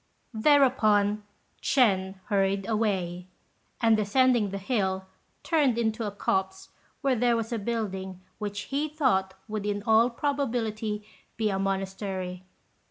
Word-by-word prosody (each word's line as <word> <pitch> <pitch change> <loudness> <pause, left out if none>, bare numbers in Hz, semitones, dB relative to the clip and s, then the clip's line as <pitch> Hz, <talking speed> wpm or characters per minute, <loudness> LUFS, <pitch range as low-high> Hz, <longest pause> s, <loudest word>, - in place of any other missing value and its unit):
Thereupon 220 -5 +4 0.4
Ch'ên 195 -8 +2
hurried 195 0 +1
away; 190 -5 -1 0.5
and 225 -2 +4
descending 225 +1 +3
the 195 - -4
hill, 190 -3 -1 0.4
turned 290 -8 +2
into 225 -1 0
a - - -3
copse 190 -1 -2 0.3
where 270 -2 +2
there 240 0 +2
was 230 +1 -3
a 230 - -1
building 195 -4 -3 0.2
which 205 -1 -3
he 295 +2 0
thought 215 -11 +1
would 215 -2 -3
in 205 0 -2
all 225 +2 +5
probability 230 -6 -2 0.3
be 215 -2 +1
a 195 - -1
monastery. 190 -1 -3
210 Hz, 125 wpm, -27 LUFS, 195-235 Hz, 0.5 s, all